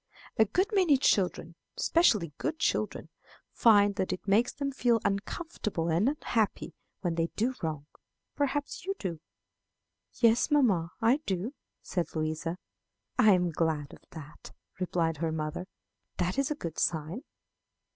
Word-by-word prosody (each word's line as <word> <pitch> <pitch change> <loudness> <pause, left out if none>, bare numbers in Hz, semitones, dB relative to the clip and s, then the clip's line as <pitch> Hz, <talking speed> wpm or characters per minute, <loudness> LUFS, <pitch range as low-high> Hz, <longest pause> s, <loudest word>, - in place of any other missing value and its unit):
A 220 - +6
good 365 - +1
many 360 -8 +4
children, 180 -8 +1 0.2
especially 210 - +3
good 320 - -2
children, - - -1 0.4
find 205 -3 +4
that 190 - -1
it 185 - -5
makes 220 +5 +3
them 280 -1 -3
feel 245 -3 +2
uncomfortable 200 - -2
and 175 +10 +3
unhappy 230 -7 -1 0.3
when 175 -3 0
they 165 0 0
do 240 +4 0
wrong. 155 -4 -3 0.5
Perhaps 285 0 -2
you 390 +2 -2
do." 170 -5 -4 0.9
"Yes, 230 +3 +3
mamma, 215 - +3
I 235 +4 +5
do," 195 +7 -2 0.3
said 175 -3 -3
Louisa. 155 +2 -2 0.6
"I 215 -4 +7
am 180 -2 +1
glad 155 -3 -1
of - - -14
that," 155 -2 -11 0.3
replied 170 -3 0
her 160 +1 -1
mother; 155 +3 -4 0.5
"that 180 +7 0
is 275 - +1
a 300 - -1
good 170 - -6
sign." 160 - -1
195 Hz, 140 wpm, -29 LUFS, 165-250 Hz, 0.9 s, I